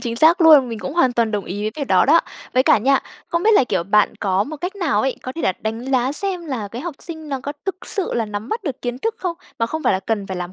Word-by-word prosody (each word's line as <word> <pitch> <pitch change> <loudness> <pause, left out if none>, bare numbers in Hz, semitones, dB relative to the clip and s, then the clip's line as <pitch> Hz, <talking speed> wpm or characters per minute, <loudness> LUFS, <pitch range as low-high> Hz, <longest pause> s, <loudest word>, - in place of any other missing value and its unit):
chính 235 -2 -3
xác 325 +7 +5
luôn. 305 -6 +7
Mình 230 -2 -5
cũng 275 - -5
hoàn 260 -7 +3
toàn 230 -2 +1
đồng 210 -2 -2
ý 205 +3 -5
với 215 - -1
việc 285 - -2
đó - - +5
đó. 325 +4 +6 0.3
Với 255 - +5
cả - - +5
nha, 270 +5 +3 0.3
không 335 0 -1
biết 440 - +4
là, 340 - +5
kiểu, 205 - -1
bạn 205 +3 +2
có 195 -1 +1
một 310 +5 -7
cách 360 +6 -5
nào 345 -7 +1
ấy, 265 -1 -1
có 255 - -5
thể 330 - -6
là - - +2
đánh 225 +3 -4
giá 260 +1 +2
xem 365 0 -3
là 240 -8 -4
cái 235 +5 -7
học 340 -2 -5
sinh 315 -3 -8
nó 270 -2 -3
có 285 +2 -5
thực 380 -1 -4
sự 390 -3 -1
là 230 - 0
nắm 210 +2 -5
bắt 450 0 -3
được 275 -5 -4
kiến 245 0 -3
thức 450 +6 -2
không? 350 -3 -3 0.2
Mà 230 - +1
không 315 +6 -4
phải - - +3
là 190 - 0
cần 205 0 -2
phải 190 -1 -5
làm 180 0 -5
260 Hz, 310 wpm, -20 LUFS, 220-325 Hz, 0.3 s, luôn